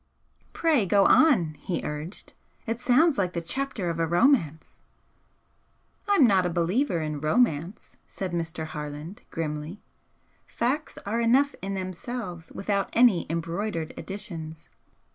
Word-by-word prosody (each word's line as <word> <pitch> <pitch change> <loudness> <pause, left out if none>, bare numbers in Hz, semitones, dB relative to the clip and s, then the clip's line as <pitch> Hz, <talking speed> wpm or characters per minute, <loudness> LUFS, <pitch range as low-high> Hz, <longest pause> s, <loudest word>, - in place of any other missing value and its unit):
"Pray 300 - +2
go 200 +2 +4
on!" 210 - +5
he 175 - -3
urged 150 +5 -6 0.3
"It 230 0 -2
sounds 265 +3 +3
like 180 -2 0
the 170 - -1
chapter 260 +2 -3
of 170 -1 -2
a 165 - +1
romance." 170 - +1 1.3
"I'm 400 -9 +5
not 195 -5 +4
a 180 - 0
believer 175 - 0
in 150 -2 -4
romance," 175 0 0
said 190 -3 -5
Mr. 165 -1 -3
Harland, 150 +6 -7
grimly 155 +3 -5 0.6
"Facts 265 +6 -2
are 225 +4 -1
enough 265 +5 +3
in 195 0 -3
themselves 185 -2 -6
without 200 0 -1
any 230 -7 +4
embroidered 170 +1 -3
additions. 170 -6 -8
185 Hz, 125 wpm, -26 LUFS, 165-235 Hz, 1.3 s, on